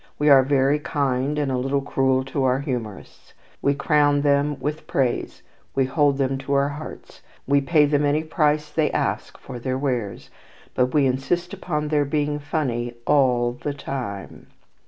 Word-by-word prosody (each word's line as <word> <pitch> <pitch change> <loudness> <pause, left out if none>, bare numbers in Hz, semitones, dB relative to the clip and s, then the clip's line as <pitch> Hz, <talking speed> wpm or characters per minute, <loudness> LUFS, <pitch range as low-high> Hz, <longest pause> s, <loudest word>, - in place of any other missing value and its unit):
We 150 0 +2
are 135 -1 +8
very 135 +2 +2
kind 140 -1 -1
and 145 -2 0
a 130 - 0
little 135 +2 -1
cruel 130 -1 +1
to 135 +1 -2
our 130 +1 +2
humourists. 120 -7 -6 0.3
We 140 0 +2
crown 145 0 +2
them 145 0 +1
with 150 +4 -4
praise, 135 -7 -1 0.3
we 135 - +2
hold 140 +1 +2
them 135 -1 0
to 135 +1 -3
our 140 0 +2
hearts, 150 +2 -9 0.2
we 140 +1 +3
pay 150 +1 +4
them 145 0 +1
any 145 +2 +1
price 150 -2 0
they 155 -1 +1
ask - - -2
for 120 - -9
their 130 +2 -2
wares; 125 -7 -3 0.4
but 125 - +2
we 145 -2 +4
insist 155 +7 -1
upon 150 -3 -3
their 150 -1 +2
being 145 +1 -1
funny 125 -6 -2
all 125 -4 +3
the 140 +4 -5
time. 100 - -6
140 Hz, 170 wpm, -23 LUFS, 130-150 Hz, 0.4 s, are